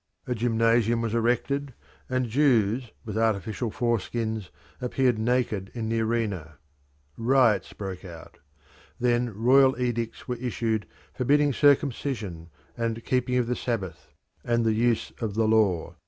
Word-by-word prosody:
A 125 - -1
gymnasium 115 0 +2
was 115 -1 -2
erected, 125 +4 0 0.3
and 130 -1 0
Jews 120 -2 +2 0.2
with 110 0 -3
artificial 110 +1 0
foreskins 110 -3 -2 0.3
appeared 125 -2 +1
naked 110 -4 0
in 110 -2 -3
the 115 0 0
arena. 105 -9 -2 0.6
Riots 115 -5 +3
broke 95 -3 -6
out. 85 -3 -11 0.6
Then 120 0 +1
royal 130 +5 +4
edicts 120 -2 -2
were 125 - -2
issued 115 -2 -2 0.3
forbidding 145 +2 +2
circumcision, 125 - +1 0.3
and 115 -1 -3
keeping 125 -1 0
of 125 -1 +2
the 125 +1 -1
Sabbath, 100 -11 -4 0.3
and 120 -1 +1
the 110 - +3
use 115 +1 +1
of 105 -3 -2
the 110 0 +2
law. 105 -7 +2
115 Hz, 130 wpm, -26 LUFS, 110-125 Hz, 0.6 s, royal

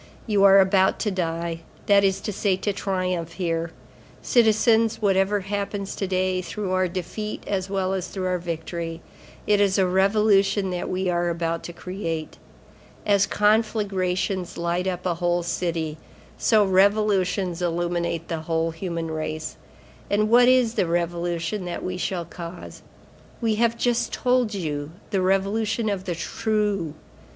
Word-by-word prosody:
You 205 -3 +2
are 195 0 +8
about 190 0 +4
to 210 - 0
die, 170 -2 -2 0.3
that 200 -1 +5
is 195 0 +1
to 210 - -4
say 195 -1 +1
to 205 +1 -1
triumph, 185 -4 -2
here. 165 -2 -2 0.5
Citizens, 225 -1 +3
whatever 195 0 +2
happens 200 0 -3
to 195 - -2
day, 185 0 0
through 195 +1 -4
our 185 0 +2
defeat 190 +4 -5
as 190 -1 -2
well 190 -1 0
as 185 -1 -2
through 185 +1 -4
our 180 -1 0
victory, 165 0 -5 0.4
it 205 -1 +3
is 200 -1 +3
a 190 - +4
revolution 195 +1 +3
that 180 -1 -3
we 185 +1 -1
are 175 -1 +1
about 165 -1 -2
to - - -6
create. 165 -3 -5 0.7
As 200 -1 +3
conflagrations 200 -4 0
light 170 +2 -1
up 180 -1 -3
a 180 - +1
whole 175 0 0
city, 165 -3 -2 0.4
so 215 -3 +3
revolutions 190 -2 +2
illuminate 170 -1 -1
the 165 - -3
whole 165 0 -1
human 165 -1 -4
race. 155 0 -4 0.5
And 215 +1 +1
what 245 +1 +7
is 250 -3 +4
the 185 - +1
revolution 170 +2 -1
that 175 - -5
we 185 0 -3
shall 180 -1 -2
cause? 170 +1 -9 0.6
I 225 - +3
have 230 +2 +1
just 240 0 0
told 250 -4 +1
you, 150 -4 -4 0.2
the 195 - +1
Revolution 210 +4 +1
of 195 -2 -3
the 175 -3 -2
True. 205 -4 -1
185 Hz, 150 wpm, -24 LUFS, 170-205 Hz, 0.7 s, are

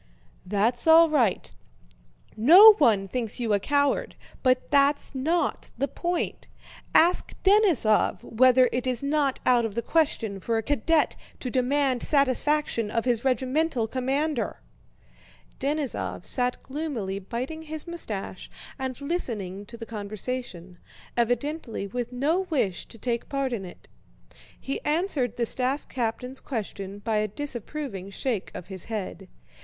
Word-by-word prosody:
"That's 220 - 0
all 325 0 +7
right. 240 -11 +1 0.8
No 355 - +9
one 210 -9 +3
thinks 235 +2 -2
you 230 -3 0
a 200 - +3
coward, 285 - 0 0.3
but 255 -1 +1
that's 285 0 +2
not 320 +6 -1
the 275 - 0
point. 345 +5 -3 0.5
Ask 350 +3 +4
Denísov 380 - +3
whether 255 +2 +4
it 250 +1 -2
is 250 0 -1
not 280 -2 +1
out 245 -2 +4
of 220 -3 -3
the 235 - -1
question 230 -11 0
for 225 +4 -1
a 225 - -1
cadet 295 +4 +1 0.2
to 250 - -4
demand 260 0 +1
satisfaction 280 -4 +2
of 230 +2 -1
his 240 -3 +1
regimental 265 0 +1
commander?" 265 +3 -1 1.0
Denísov 285 -1 -2
sat 250 -1 -1
gloomily 260 -10 -4
biting 250 +10 -5
his 315 -1 -4
mustache 215 - -5 0.3
and 260 -1 -4
listening 210 - -3
to 235 - -10
the 230 - -7
conversation, 205 -4 -6 0.4
evidently 245 0 -1
with 240 +4 -4
no 315 +9 0
wish 205 - -1
to - - -14
take 235 +1 -3
part 275 -2 -1
in 200 -5 -4
it. 175 - -13 0.7
He 275 - -4
answered 295 - 0
the 235 - +1
staff 260 +4 -1
captain's 250 +2 -3
question 200 -5 -5
by 215 +1 -1
a 210 0 +1
disapproving 240 -4 -5
shake 215 0 -3
of 180 - -7
his 190 -3 -8
head. 200 -4 -5
255 Hz, 135 wpm, -26 LUFS, 220-290 Hz, 1.0 s, No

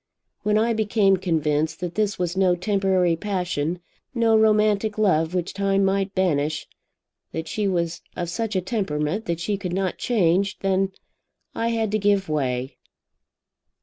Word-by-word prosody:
When 210 0 +2
I 230 +2 +2
became 210 -3 +2
convinced 155 -3 0
that 175 -1 -4
this 210 -1 0
was 180 0 -2
no 185 -2 +3
temporary 190 -2 +1
passion, 180 -3 -2 0.3
no 230 -1 +3
romantic 215 -1 +3
love 180 -5 +2
which 180 -1 -2
time 195 0 +1
might 195 0 0
banish, 155 -5 0 0.7
that 160 0 -4
she 210 -2 -1
was 170 -3 -1
of 175 - -3
such 220 +4 -3
a 185 - +2
temperament 185 -2 -2
that 170 -1 -2
she 200 +4 -1
could 185 -3 -4
not 190 -1 -1
change, 190 -3 +1
then 195 0 +1 0.6
I 230 - -1
had 225 -2 0
to 215 - +1
give 200 -1 +2
way. 130 -4 -2
190 Hz, 150 wpm, -23 LUFS, 170-210 Hz, 0.7 s, no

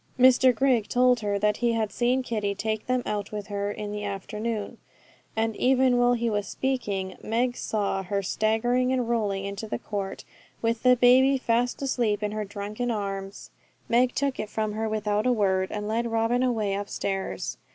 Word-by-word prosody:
Mr 255 0 +6
Grigg 250 -4 +2
told 250 0 +4
her 205 -2 -1
that 210 +1 +1
he 240 -1 +1
had 220 -2 -1
seen 250 +4 +1
Kitty 210 -4 -2
take 220 +1 -3
them 255 0 +1
out 205 -1 -3
with 210 -1 -5
her 200 0 -2
in 210 0 -5
the 210 0 -4
afternoon; 210 +2 -4 0.6
and 225 0 0
even 255 -1 +3
while 245 0 +4
he 235 -1 0
was 205 -2 -1
speaking, 205 -8 -2
Meg 245 +3 0
saw 200 -5 -1
her 200 +1 -2
staggering 240 +6 +1
and 250 -2 0
rolling 205 -4 0
into 200 +2 -5
the - - -3
court, 200 -2 -5 0.3
with 230 0 -1
the 250 0 +6
baby 255 +3 +5
fast 245 +1 0
asleep 230 -6 0
in 210 - -1
her 215 0 -3
drunken 205 +4 -4
arms. 195 -2 -4 0.4
Meg 245 +1 +2
took 280 -2 -1
it 210 - -3
from 215 -1 -2
her 220 +1 -2
without 210 +1 0
a - - +4
word, 190 -5 +1
and 210 0 -4
led 230 +2 0
Robin 230 +2 +1
away 225 -6 0
upstairs. 195 -1 -3
220 Hz, 185 wpm, -26 LUFS, 205-245 Hz, 0.6 s, Mr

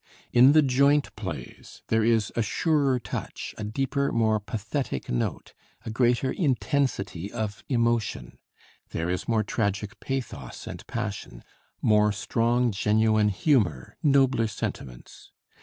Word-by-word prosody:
In 130 +4 +7
the 155 -1 +6
joint 140 +2 +3
plays 85 - -8
there 110 0 +3
is 115 -1 +2
a 115 - +1
surer 140 +5 +1
touch, 100 -4 -6
a - - -3
deeper, 135 +6 -1
more 110 -2 +2
pathetic 110 - -4
note, - - -2 0.3
a 110 - -4
greater 120 +3 +2
intensity 130 - -1
of 105 -2 -4
emotion; 115 - 0 0.5
there 85 +2 -2
is 90 - -3
more 110 -2 +2
tragic 100 +1 -2
pathos 135 -2 -5
and - - -8
passion, 105 - -5 0.4
more 105 -1 +4
strong 115 +4 +1
genuine 110 +1 +2
humor, 95 - +1
nobler 135 -5 +3
sentiments. 60 - -7
110 Hz, 125 wpm, -26 LUFS, 105-130 Hz, 0.5 s, In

